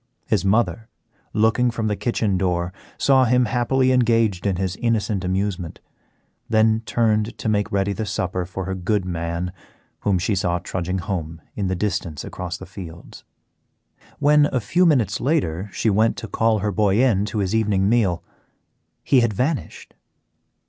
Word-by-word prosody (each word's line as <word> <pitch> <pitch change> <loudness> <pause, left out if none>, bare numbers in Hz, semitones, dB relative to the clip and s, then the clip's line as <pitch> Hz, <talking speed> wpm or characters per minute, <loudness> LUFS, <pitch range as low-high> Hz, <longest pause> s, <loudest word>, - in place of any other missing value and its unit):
His - - +1
mother, 110 +3 +1 0.4
looking 110 +3 +2
from 115 -1 -3
the 105 -1 0
kitchen 110 -3 0
door, 90 -1 -1 0.2
saw 135 -2 +4
him 125 +1 +3
happily 130 +2 +1
engaged 115 -6 +2
in 95 - +1
his 95 0 -2
innocent 110 -4 0
amusement, 95 -2 -2 0.7
then 110 0 +3
turned 110 -1 +1
to - - -4
make 105 -1 0
ready 100 0 0
the 110 +1 -4
supper 90 -1 -2
for 95 +1 -5
her 95 - -3
good 95 +1 -1
man, 85 0 -3 0.5
whom 100 -2 +1
she 95 +5 0
saw 90 -2 0
trudging 90 +1 -3
home 85 -4 -4 0.2
in 100 -3 -1
the 95 - -1
distance 90 -6 -2
across 90 0 -5
the 95 - -9
fields. 90 -3 -10 0.9
When, 145 0 +4
a 130 - -1
few 175 +9 +2
minutes 120 - +2
later, 105 - 0
she 110 - 0
went 110 +3 +2
to 115 - -6
call 110 -1 +1
her 105 0 -1
boy 100 +1 +2
in 115 -7 +3
to 110 - -4
his 100 -1 0
evening 105 -3 +2
meal, 100 -7 +2 0.8
he 135 - +4
had 115 -3 +1
vanished. 135 +8 -3
105 Hz, 160 wpm, -22 LUFS, 95-115 Hz, 0.9 s, saw